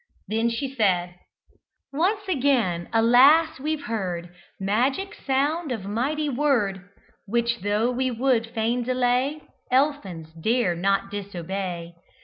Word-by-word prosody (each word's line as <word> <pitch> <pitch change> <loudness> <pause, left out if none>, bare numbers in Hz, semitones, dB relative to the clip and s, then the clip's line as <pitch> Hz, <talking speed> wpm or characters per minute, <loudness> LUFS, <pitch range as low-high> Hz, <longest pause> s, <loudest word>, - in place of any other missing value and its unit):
Then 225 +2 +1
she 260 +4 -3
said, 180 -7 +1 0.8
"Once 395 +7 0
again, 245 - +1
alas! 265 +8 +5
we've 300 +1 -2
heard 180 -8 -4 0.3
Magic 250 - 0
sound 290 +3 -1
of 220 -6 -4
mighty 275 +9 -1
word; 235 -9 0 0.4
Which, 235 +2 0
tho' 210 +5 +1
we 260 +1 0
would 240 -1 +1
fain 230 +2 -1
delay, 255 +4 0 0.3
Elfins 205 - 0
dare 215 +3 +1
not 195 +2 0
disobey. 185 -3 -5
235 Hz, 115 wpm, -24 LUFS, 195-275 Hz, 0.8 s, alas